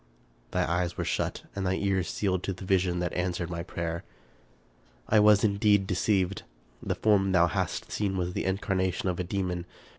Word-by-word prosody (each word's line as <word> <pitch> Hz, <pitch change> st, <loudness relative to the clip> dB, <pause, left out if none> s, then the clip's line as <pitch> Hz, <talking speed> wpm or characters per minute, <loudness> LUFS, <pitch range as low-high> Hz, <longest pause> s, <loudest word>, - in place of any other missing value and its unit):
Thy -, -, 0 dB
eyes 85 Hz, +1 st, -1 dB
were -, -, -2 dB
shut -, -, -2 dB
and 100 Hz, -, -2 dB
thy 95 Hz, 0 st, +1 dB
ears 95 Hz, -2 st, 0 dB
sealed 95 Hz, -3 st, 0 dB
to 95 Hz, -, -2 dB
the 95 Hz, +1 st, -9 dB
vision 90 Hz, -2 st, +2 dB
that 90 Hz, 0 st, -2 dB
answered 90 Hz, -1 st, -2 dB
my 85 Hz, 0 st, -3 dB
prayer. 85 Hz, -1 st, -4 dB, 0.5 s
" -, -, -34 dB
I 110 Hz, -, +5 dB
was 105 Hz, -1 st, +6 dB
indeed 100 Hz, -1 st, +3 dB
deceived. 95 Hz, 0 st, +1 dB, 0.4 s
The -, -, -2 dB
form 95 Hz, -3 st, +3 dB
thou 85 Hz, -2 st, +6 dB
hast 85 Hz, -, -2 dB
seen 100 Hz, -2 st, -1 dB
was 90 Hz, 0 st, -2 dB
the -, -, -2 dB
incarnation 95 Hz, -1 st, 0 dB
of 90 Hz, -, -2 dB
a -, -, 0 dB
demon. 90 Hz, -1 st, -2 dB
95 Hz, 185 wpm, -28 LUFS, 85-100 Hz, 0.5 s, was